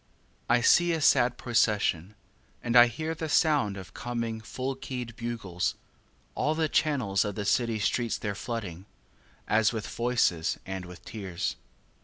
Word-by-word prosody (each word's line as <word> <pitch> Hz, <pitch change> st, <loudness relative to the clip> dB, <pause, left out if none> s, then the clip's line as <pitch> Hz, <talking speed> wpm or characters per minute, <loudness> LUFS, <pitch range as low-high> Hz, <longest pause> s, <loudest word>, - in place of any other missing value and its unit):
3. -, -, +4 dB
I -, -, -1 dB
see 175 Hz, -, +5 dB
a 165 Hz, -, 0 dB
sad 125 Hz, -4 st, +4 dB
procession, 105 Hz, -6 st, +1 dB, 0.5 s
And 120 Hz, 0 st, -1 dB
I 120 Hz, 0 st, +9 dB
hear 155 Hz, +7 st, -3 dB
the 160 Hz, 0 st, -5 dB
sound 145 Hz, -, +2 dB
of 95 Hz, -1 st, -10 dB
coming 115 Hz, -2 st, -4 dB
full 130 Hz, +4 st, -4 dB
keyed 125 Hz, -3 st, -6 dB
bugles; 115 Hz, -7 st, -3 dB, 0.6 s
All 155 Hz, +1 st, 0 dB
the 160 Hz, 0 st, +1 dB
channels 130 Hz, -12 st, +1 dB
of 105 Hz, -2 st, -4 dB
the 105 Hz, -, -3 dB
city 115 Hz, +2 st, +1 dB
streets 115 Hz, +2 st, 0 dB
they're 105 Hz, -2 st, -3 dB
flooding, 100 Hz, -4 st, -6 dB, 0.6 s
As 110 Hz, +1 st, +3 dB
with 110 Hz, -3 st, -4 dB
voices 115 Hz, -9 st, 0 dB
and 95 Hz, -1 st, -5 dB
with 90 Hz, 0 st, -12 dB
tears. 95 Hz, -6 st, -4 dB
115 Hz, 155 wpm, -28 LUFS, 100-125 Hz, 0.6 s, I